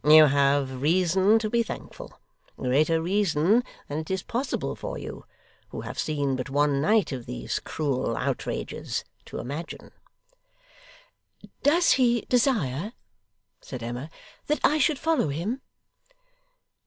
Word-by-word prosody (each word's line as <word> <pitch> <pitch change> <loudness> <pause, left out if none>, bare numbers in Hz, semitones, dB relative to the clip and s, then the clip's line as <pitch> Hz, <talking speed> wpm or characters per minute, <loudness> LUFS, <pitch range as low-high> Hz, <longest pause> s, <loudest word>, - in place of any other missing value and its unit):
You 155 +1 +9
have 140 -2 +2
reason 185 +6 +4
to 220 -1 -1
be 235 +2 +2
thankful: 230 - -8 0.4
greater 150 +6 +2
reason 190 +4 +2 0.2
than 145 +2 -3
it 160 - -7
is 190 -1 -1
possible 260 +3 -2
for - - -5
you, - - -8 0.4
who - - -6
have - - -7
seen 145 -3 0
but 130 +1 -4
one 145 0 +2
night 210 +4 +3
of 125 -3 -5
these - - -3
cruel 140 -5 -2
outrages, - - -3 0.2
to - - -7
imagine.' 145 +7 -6 1.7
'Does 335 +4 +4
he 240 -3 +4
desire,' 220 - +1 0.7
said 125 -3 -7
Emma, 120 +6 -5 0.4
'that 300 - 0
I 305 - +4
should 300 0 +3
follow 320 - +1
him? 180 - -3
160 Hz, 130 wpm, -26 LUFS, 140-225 Hz, 1.7 s, You